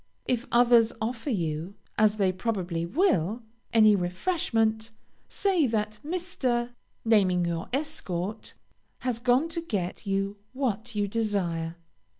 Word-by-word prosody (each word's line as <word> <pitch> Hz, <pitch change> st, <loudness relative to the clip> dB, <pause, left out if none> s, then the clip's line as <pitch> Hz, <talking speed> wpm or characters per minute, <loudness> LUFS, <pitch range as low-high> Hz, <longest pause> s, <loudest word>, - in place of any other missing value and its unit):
If 250 Hz, +1 st, -1 dB
others 235 Hz, -1 st, +5 dB
offer 230 Hz, +4 st, -3 dB
you, 170 Hz, -, -2 dB, 0.2 s
as 215 Hz, 0 st, +4 dB
they 195 Hz, -3 st, +2 dB
probably 185 Hz, -4 st, -2 dB
will, 235 Hz, -, +1 dB, 0.3 s
any 215 Hz, -2 st, +6 dB
refreshment, 220 Hz, -, 0 dB, 0.4 s
say 370 Hz, -8 st, +2 dB
that 215 Hz, -2 st, -2 dB
Mr. 285 Hz, -8 st, -1 dB, 0.3 s
(naming 190 Hz, -6 st, +4 dB
your 170 Hz, -1 st, -3 dB
escort) 220 Hz, -, -3 dB, 0.5 s
has 250 Hz, -3 st, -1 dB
gone 250 Hz, +6 st, +3 dB
to 335 Hz, +1 st, -3 dB
get 200 Hz, -, -3 dB
you 195 Hz, +1 st, -1 dB, 0.2 s
what 240 Hz, -3 st, -2 dB
you 205 Hz, -1 st, +1 dB
desire. 185 Hz, -7 st, -1 dB
220 Hz, 120 wpm, -27 LUFS, 190-245 Hz, 0.5 s, any